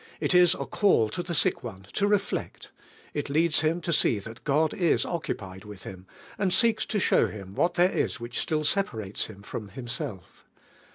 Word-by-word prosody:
It - - 0
is 180 -1 +6
a - - -4
call 185 - +3
to 175 - -3
the 175 -1 -4
sick - - +2
one 95 -5 -8
to 200 - +1
reflect; 205 -1 -2 0.4
it 145 -1 -3
leads 160 +2 +3
him 160 +2 +1
to 170 - -1
see 115 -7 +3
(hat 110 +4 -11
Gad 150 +2 +2
is 180 -7 +2
occupied 95 - -5
with 105 -3 -11
him, 95 0 -10 0.3
and 190 -3 +1
seeks 220 +3 +3
to 210 - 0
show - - +3
him 100 -3 -9
what 170 - +1
there 180 +2 +4
is - - -1
which 120 +1 -4
still 155 -1 0
separates 110 - -1
him 100 -2 -12
from 105 0 -6
Himself. 120 - -6
150 Hz, 190 wpm, -27 LUFS, 105-175 Hz, 0.4 s, is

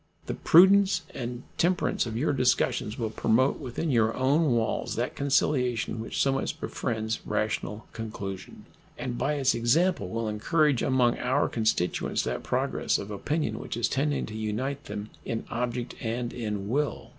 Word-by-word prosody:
The - - -3
prudence 190 +1 +6
and 120 0 -5 0.2
temperance 175 -7 +1
of 110 -1 -4
your 145 +4 +1
discussions 125 -4 +1
will 115 -3 -2
promote 115 +5 +2
within 130 +5 -3
your 115 -2 +2
own 140 +2 +3
walls 115 -1 -1
that 120 +2 -2
conciliation 125 -5 +1
which 115 - -4
so 135 - +3
much 135 - -2
befriends 110 -2 -2
rational 105 0 -2
conclusion, 100 -5 -7 0.3
and 125 -2 -3
by 135 +5 0
its 135 -3 +2
example 120 - +2
will 115 +2 -2
encourage 140 +6 +2
among 125 -2 +2
our 130 +4 +1
constituents 110 -6 0
that - - -2
progress - - 0
of 100 - -6
opinion 150 +10 -2
which - - -5
is 120 - +2
tending 145 +2 0
to 110 - -8
unite 125 +7 -3
them 105 +1 -6
in 115 -1 -3
object 120 +1 -2
and 120 +1 -2
in 105 -4 -3
will. 145 +6 -1
120 Hz, 155 wpm, -27 LUFS, 110-140 Hz, 0.3 s, prudence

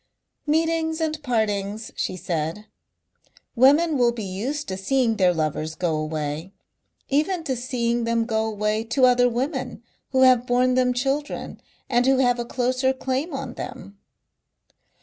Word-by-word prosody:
"Meetings 320 +1 +1
and 310 -1 -2
partings," 220 -4 -1
she 185 - -2
said. 165 +4 -3 0.9
"Women 290 +4 +4
will 240 -1 +4
be 235 -2 -6
used 245 +11 -4
to 190 - -2
seeing 225 +4 +1
their 185 -2 +4
lovers 155 -1 -2
go 170 -3 -1
away. 155 +3 -4 0.6
Even 320 +5 +1
to 265 -5 -2
seeing 240 -1 -1
them 230 0 +1
go 220 -1 0
away 215 0 -1
to 245 +3 +2
other 245 0 +4
women 255 0 -3 0.3
who 260 0 +3
have 250 -1 +5
borne 250 +1 +3
them 250 0 +3
children 275 +4 -2 0.3
and 245 0 +2
who 265 0 +4
have 245 -2 +2
a 240 - -2
closer 255 +2 0
claim 265 +5 -2
on 270 -3 -5
them." 200 -6 -8
245 Hz, 150 wpm, -24 LUFS, 210-265 Hz, 0.9 s, have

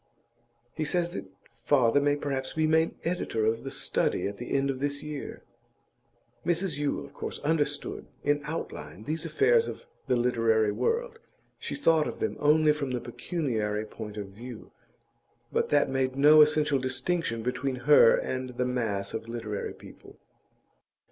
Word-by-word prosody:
He 155 - -2
says 175 +2 0
that - - -5 0.2
father 120 +2 +2
may 145 0 +3
perhaps 135 -2 -3
be 160 0 +1
made 160 +1 +2
editor 165 -10 -1
of 115 +1 0
The 135 - -4
Study - - 0
at 100 0 -6
the 120 - -7
end 140 0 +2
of 130 - -6
this 145 +1 -2
year.' 150 -2 -6 1.0
Mrs 175 -3 0
Yule, 145 -1 -1
of - - -15
course, - - -5
understood, 145 -2 -1 0.2
in 145 0 +2
outline, 150 - -6
these 155 +6 -3
affairs 460 +3 +3
of - - -7 0.2
the 125 - +3
literary 115 -3 +2
world; 460 - -1 0.4
she - - -4
thought 165 - +3
of - - -6
them - - -1
only 150 +1 +4
from 145 -3 -3
the 125 -1 -1
pecuniary 115 - -2
point 105 -1 -8
of 100 -2 -5
view, 115 +3 -10 0.8
but - - +1
that 145 -1 +3
made 130 -1 -1
no 150 +3 +7
essential 150 -2 +3
distinction 130 -1 -1
between 130 +2 -1
her 145 -6 +7
and 130 -1 -4
the 125 - +1
mass 110 -6 -2
of 110 +1 -5
literary 115 -3 -4
people. - - -14
140 Hz, 160 wpm, -28 LUFS, 115-155 Hz, 1.0 s, no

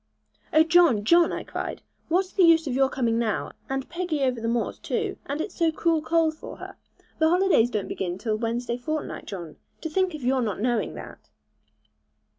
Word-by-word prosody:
'Oh, 310 - +6
John, 320 -10 +4
John,' 340 +6 +5
I - - -4
cried, - - -5 0.3
'what's 365 +3 +1
the 390 - +2
use 330 -2 +6
of 270 - -2
your 265 +1 +3
coming 235 -4 0
now, 220 -3 -1 0.2
and 270 0 -2
Peggy 335 -4 -2
over 250 -3 0
the 230 - -2
moors, 235 0 -1
too, - - -2
and 285 +2 -3
it 365 - -3
so 330 -2 +1
cruel 325 0 +1
cold 320 0 +2
for - - -10
her? - - -9 0.4
The 320 0 +4
holidays 355 -9 +4
don't 210 -4 -2
begin 180 -2 -3
till 215 +2 -1
Wednesday 235 +1 -2
fortnight, 310 +5 -4
John. 175 -6 -7 0.2
To 320 - -4
think 375 0 +1
of 295 - -8
your 260 +1 +2
not 210 -5 -2
knowing 240 0 0
that!' - - -11
270 Hz, 195 wpm, -25 LUFS, 235-330 Hz, 0.4 s, Oh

